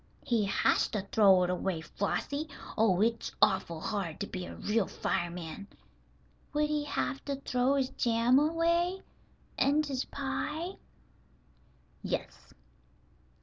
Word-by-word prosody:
"He 225 -4 +2
has 195 - +2
to 210 -4 -3
throw 195 -4 +6
it 180 - 0
away, 180 -2 -1
Flossie. 285 - -2 0.3
Oh, 205 -4 +3
it's 230 +1 +1
awful 170 -4 +2
hard 195 -4 -3
to - - 0
be 185 -2 -6
a - - -8
real 210 -1 0
fireman." 175 +2 -3 0.9
"Would 300 0 +1
he 300 -1 0
have 275 -1 -2
to 280 - -1
throw 260 0 +1
his 265 -2 +1
jam 235 +2 +3
away, 340 +4 +1 0.6
and 290 +3 +3
his 270 -3 -2
pie?" 300 +4 -3 1.3
"Yes." - - -4
235 Hz, 125 wpm, -31 LUFS, 195-290 Hz, 1.3 s, throw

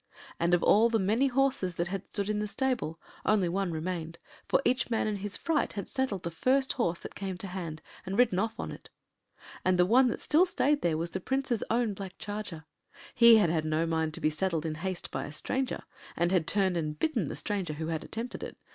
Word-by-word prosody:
And 170 +1 +4
of 175 - -1
all 225 +3 +5
the 230 - +2
many 220 +7 +2
horses 265 -9 +1
that 170 +1 -1
had 195 0 -5
stood 200 -1 -2
in 210 0 0
the 210 - -1
stable 240 - -1 0.2
only 205 -4 +3
one 190 +1 -1
remained, 165 0 -4 0.3
for - - +3
each 255 0 +2
man 225 - +1
in 210 -1 -1
his 205 +1 -5
fright 320 -3 0
had 200 -3 -5
saddled 260 -9 -2
the 170 - -3
first 265 +10 +2
horse 175 -9 0
that - - -8
came 190 -2 -4
to 190 - -6
hand 175 -5 -6 0.2
and 190 +1 -4
ridden 225 -7 +4
off 225 +2 -2
on - - -3
it. - - -11 0.7
And 185 0 +3
the 180 - +5
one 250 +7 +5
that 240 - -2
still 345 +5 +4
stayed 295 -4 +2
there 165 -2 +1
was 170 +1 -3
the 190 - -3
Prince’s 265 +1 -1
own 230 -2 +1
black 190 -1 -8
charger. 205 -6 -6 0.5
He 235 -1 +8
had 200 -7 +3
had 160 -2 +1
no 155 +1 +1
mind 160 -1 -1
to - - -6
be 155 - +2
saddled 165 0 -1
in 160 - -1
haste 185 -1 -4
by - - -3
a - - -7
stranger, 255 - -2 0.3
and 170 +1 +2
had 175 -4 +2
turned 190 -1 +2
and 155 -2 -2
bitten 230 - 0
the - - -4
stranger 175 +1 -2
who 160 +2 -4
had 160 -1 -2
attempted 230 +3 -5
it. - - -7
190 Hz, 230 wpm, -30 LUFS, 170-230 Hz, 0.7 s, He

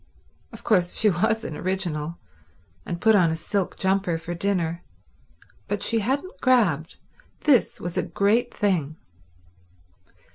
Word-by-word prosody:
Of - - -12
course 180 -5 +2
she 215 -2 +4
was 220 +5 0
an 155 - -5
original, 170 -4 -3 0.7
and 170 - -4
put 220 +4 +4
on 180 -5 +4
a 160 - -1
silk 190 +3 -3
jumper 190 -3 +1
for 165 +2 -6
dinner, 170 -2 -1 0.9
but 205 0 -2
she 230 - +3
hadn't 275 - -3
grabbed. 195 - +2 0.4
This 275 -6 +3
was 175 0 -5
a - - +2
great 225 +5 +1
thing. 170 -8 -1
190 Hz, 135 wpm, -24 LUFS, 170-220 Hz, 0.9 s, she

